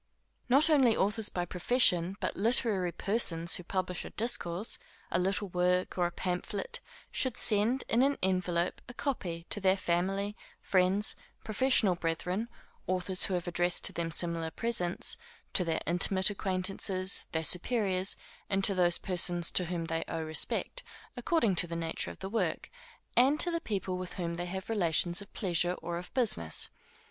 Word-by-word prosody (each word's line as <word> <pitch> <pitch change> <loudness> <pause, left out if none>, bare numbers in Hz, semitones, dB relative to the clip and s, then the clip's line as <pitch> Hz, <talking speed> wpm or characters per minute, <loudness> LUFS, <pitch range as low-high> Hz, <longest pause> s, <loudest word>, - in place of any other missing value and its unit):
Not 275 +5 +6
only 270 -8 +4
authors 210 +2 +2
by 175 -1 -2
profession, 180 -2 +2
but - - -2
literary 205 -4 +1
persons 170 -5 0
who 180 - -3
publish 185 0 -3
a - - -8
discourse, 210 -4 0 0.3
a - - +1
little 195 +2 -1
work, 180 +1 0
or 175 -1 +1
a - - -7
pamphlet, 185 +2 -4 0.3
should 260 -3 -1
send, 220 +5 +3
in 230 - +2
an 280 +1 +2
envelope, 180 -2 0
a 245 - -10
copy 175 -13 -3
to 205 - +2
their 190 0 +3
family, 195 +3 -1 0.2
friends, 190 +2 +2 0.3
professional 220 -2 +3
brethren, 180 +6 -2 0.4
authors 185 0 +2
who 190 - -1
have 175 0 -3
addressed 175 0 +1
to - - +8
them 170 -1 -2
similar 165 0 0
presents, 205 -3 -1 0.4
to 180 - +4
their 165 -2 -1
intimate 190 +3 +3
acquaintances, 190 -1 -1
their 160 -1 -1
superiors, 190 +1 0 0.3
and 195 0 +1
to 200 - +4
those 175 -2 +2
persons 175 -2 +1
to 180 - +4
whom 170 -1 -3
they 165 0 -2
owe 165 - -3
respect 160 - -1 0.3
according 245 - +1
to 175 - +4
the 170 - -5
nature 165 -1 -2
of - - -10
the 190 - -6
work, 225 +3 -2 0.4
and 270 +5 +4
to 350 - +2
the 335 0 -2
people 190 - -3
with 185 -1 -6
whom 170 -2 -3
they 175 +1 -4
have 190 +1 -5
relations 175 -3 +2
of 200 - -12
pleasure, 175 -2 +1
or 170 -1 -5
of 180 - -10
business. 190 - 0
185 Hz, 165 wpm, -31 LUFS, 175-210 Hz, 0.4 s, to